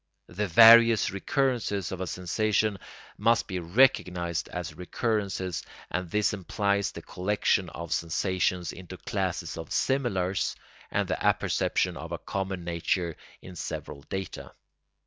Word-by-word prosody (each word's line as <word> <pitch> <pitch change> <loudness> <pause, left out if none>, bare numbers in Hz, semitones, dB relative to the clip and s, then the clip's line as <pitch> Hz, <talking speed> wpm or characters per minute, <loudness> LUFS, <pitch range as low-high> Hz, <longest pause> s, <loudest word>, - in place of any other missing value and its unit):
The 100 +4 -2
various 115 +4 +8
recurrences 105 - -1
of 95 -1 -5
a 95 - -2
sensation 105 +3 0 0.4
must 115 0 +3
be 95 -3 -4
recognised 90 -4 +2
as 90 -2 -5
recurrences, 95 0 -2 0.3
and 90 -1 -2
this 105 +2 +1
implies 100 +1 0
the - - -9
collection 95 -1 0
of 85 -1 -5
sensations 90 +1 0
into 95 0 -10
classes 90 -5 -3
of 80 - -8
similars 100 -9 0 0.3
and - - 0
the - - -2
apperception - - +1
of - - -8
a - - -2
common 95 -2 -4
nature 85 0 -1 0.3
in 90 - -10
several 75 -3 -6
data. 95 0 -5
95 Hz, 125 wpm, -28 LUFS, 90-105 Hz, 0.4 s, various